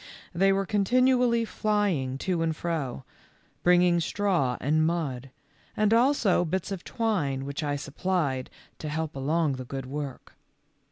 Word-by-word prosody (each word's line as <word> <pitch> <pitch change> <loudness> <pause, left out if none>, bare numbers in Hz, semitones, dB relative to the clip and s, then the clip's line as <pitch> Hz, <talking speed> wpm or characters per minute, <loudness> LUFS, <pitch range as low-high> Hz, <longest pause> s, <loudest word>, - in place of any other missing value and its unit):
They 195 +3 +3
were 195 0 +1
con 205 +2 +1
tinually 245 0 +3
flying 195 -14 0
to 180 -3 0
and 160 -1 0
fro; 155 -7 -3 0.6
bringing 175 -1 +4
straw 170 -9 0
and 155 +4 +2
mud, 145 -6 -2 0.5
and 215 0 +3
also 235 -7 +3
bits 185 +3 -2
of 190 -3 -4
twine 160 - -1
which 140 +2 -4
I 145 -1 -1
supplied 145 -2 -2 0.3
to 155 - -5
help 160 0 -3
along 145 +1 0
the 130 - -5
good 135 +1 -5
work. 140 0 -6
170 Hz, 145 wpm, -27 LUFS, 140-195 Hz, 0.6 s, bringing